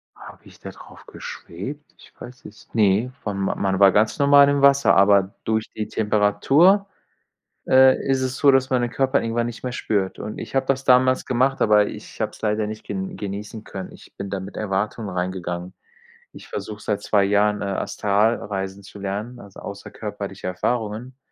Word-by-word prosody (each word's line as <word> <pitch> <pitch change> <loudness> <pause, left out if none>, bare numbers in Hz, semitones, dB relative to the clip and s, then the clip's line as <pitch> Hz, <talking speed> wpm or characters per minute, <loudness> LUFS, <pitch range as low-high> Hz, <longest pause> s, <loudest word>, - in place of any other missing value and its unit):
Habe - - -14
ich - - -17
da - - -8
drauf - - -14
geschwebt? 135 - -8
Ich - - -18
weiß 125 +1 -12
es 105 - -14
ne, 110 +3 +2
wann 100 -2 -3
man 95 0 -1
war 100 -1 +7
ganz 110 +8 +1
normal 140 0 +6
im 140 0 +1
Wasser, 140 0 +5
aber 100 0 +4
durch 110 0 -1
die 110 - -3
Temperatur, 135 - +3 0.8
äh, 130 0 +6
ist 135 -1 +2
es 130 0 -2
so, 140 - +5
dass 135 0 +2
man 130 -2 +1
den 120 -1 -2
Körper 135 +2 +1
irgendwann 115 +1 -1
nicht 120 -1 -7
mehr 125 - -3
spürt, 100 -6 -2
und 105 - -6
ich - - -8
habe 135 0 +2
das 135 0 0
damals 130 0 +4
gemacht, 130 +2 +1
aber 105 -1 +4
ich 105 +2 -10
habe 110 -1 -1
es - - -16
leider 105 0 0
nicht 110 0 -7
gen 95 -1 -5
genießen 105 +2 -6
können. 95 -3 -8
Ich - - -16
bin 100 - -5
da 100 0 -3
mit 95 +2 -9
Erwartungen 105 +1 -2
reingegangen. 90 -1 -4 0.6
Ich - - -12
versuche 105 0 -6
seit 105 -1 -2
2 100 -1 +2
Jahren, 105 +1 +2
äh, - - -2
Astralreisen 100 -1 -1
zu 100 +1 -12
lernen, 105 +5 -5
also 100 -1 -13
außerkörperliche 100 -1 -7
Erfahrungen, 115 +6 -3
105 Hz, 185 wpm, -22 LUFS, 100-125 Hz, 0.8 s, war